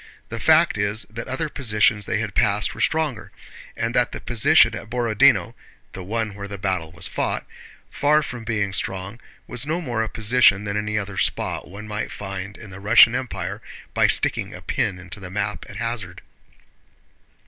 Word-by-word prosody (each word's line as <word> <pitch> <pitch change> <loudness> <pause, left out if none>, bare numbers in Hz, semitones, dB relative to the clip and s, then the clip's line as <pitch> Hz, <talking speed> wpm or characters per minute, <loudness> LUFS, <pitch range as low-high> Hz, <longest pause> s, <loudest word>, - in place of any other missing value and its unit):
The - - -5
fact - - +4
is 100 +2 +1
that 115 +1 -6
other 130 +5 -2
positions 105 -6 +1
they - - 0
had 105 -3 -3
passed 100 +1 +1
were - - -7
stronger, 155 -7 0 0.5
and 115 0 -1
that 125 0 +1
the - - -5
position 120 0 +4
at 110 0 -7
Borodinó 120 -3 +3 0.4
(the 95 - -7
one 110 +2 -2
where 100 0 -7
the 100 0 -7
battle 95 -4 -2
was 85 +2 -4
fought), - - -2 0.5
far 150 +1 +3
from 125 -3 -6
being 105 -4 -1
strong, 95 +4 -3 0.3
was 125 0 -2
no 160 +3 0
more 120 -9 -2
a 110 - -2
position 110 -2 +4
than 100 0 -3
any 105 0 -1
other 100 -2 -3
spot - - -1
one 100 +3 -9
might 105 0 -4
find 100 0 -6
in 105 -3 -11
the 95 - -9
Russian 110 +3 +7
Empire 100 -6 -4 0.3
by - - +4
sticking - - 0
a - - -10
pin 90 - -1
into 95 +3 -7
the 90 -2 -8
map 100 +2 -3
at - - -10
hazard. 110 -6 -4
105 Hz, 180 wpm, -23 LUFS, 100-120 Hz, 0.5 s, Russian